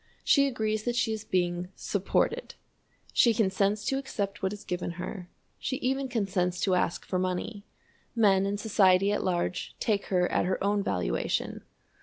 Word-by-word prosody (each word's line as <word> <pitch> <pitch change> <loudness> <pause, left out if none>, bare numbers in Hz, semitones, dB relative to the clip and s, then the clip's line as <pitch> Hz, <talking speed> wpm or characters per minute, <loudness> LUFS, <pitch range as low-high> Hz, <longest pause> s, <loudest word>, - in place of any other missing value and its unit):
She 280 -1 +5
agrees 215 -4 -1
that 240 -1 0
she 235 -2 +1
is 220 -1 -5
being 175 -3 0
"supported"; 200 -2 -1 0.6
she 235 -2 +5
consents 200 0 +1
to 270 - +1
accept 205 -7 -4
what 190 - 0
is 210 0 -8
given 175 -1 -3
her; 180 +1 -6 0.3
she 260 +3 -2
even 265 +1 -1
consents 190 -7 -1
to 190 - +2
ask 180 -1 0
for 185 - -1
money. 185 +3 -3 0.5
Men 195 -4 +4
and 200 0 -2
society 195 -2 +4
at 205 - 0
large 180 -1 -1
take 205 -3 0
her 180 -2 +2
at - - +2
her 185 +1 -1
own 205 +1 +2
valuation. 90 - -1
200 Hz, 165 wpm, -28 LUFS, 185-220 Hz, 0.6 s, She